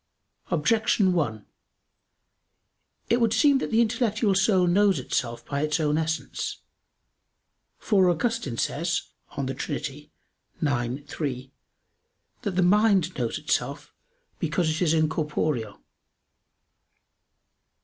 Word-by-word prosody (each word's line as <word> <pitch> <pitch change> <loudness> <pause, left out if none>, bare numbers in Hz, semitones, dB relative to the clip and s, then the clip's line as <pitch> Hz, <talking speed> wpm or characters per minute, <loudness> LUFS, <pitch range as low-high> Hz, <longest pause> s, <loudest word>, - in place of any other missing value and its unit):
Objection 195 +3 +2
1: 110 - -1 1.7
It 240 +1 +3
would 225 -2 +3
seem 275 +5 +4
that - - -3
the 230 0 +3
intellectual 230 -3 +1
soul 190 -1 +3
knows 195 +2 +3
itself 120 -1 -3
by 140 0 -2
its 150 +2 0
own 150 -1 +1
essence. 160 0 -2 1.2
For 190 -5 +3
Augustine 175 - -1
says 170 +7 -1 0.3
(De 135 -1 -2
Trin. 145 - -3
ix, 145 -1 -5
3), 130 -3 -4 0.9
that 210 -5 -2
"the 185 - +3
mind 195 -2 +3
knows - - -2
itself, - - -2 0.5
because 170 -4 0
it 155 - -3
is 165 -2 +3
incorporeal." 150 -7 -1
165 Hz, 105 wpm, -26 LUFS, 145-205 Hz, 1.7 s, seem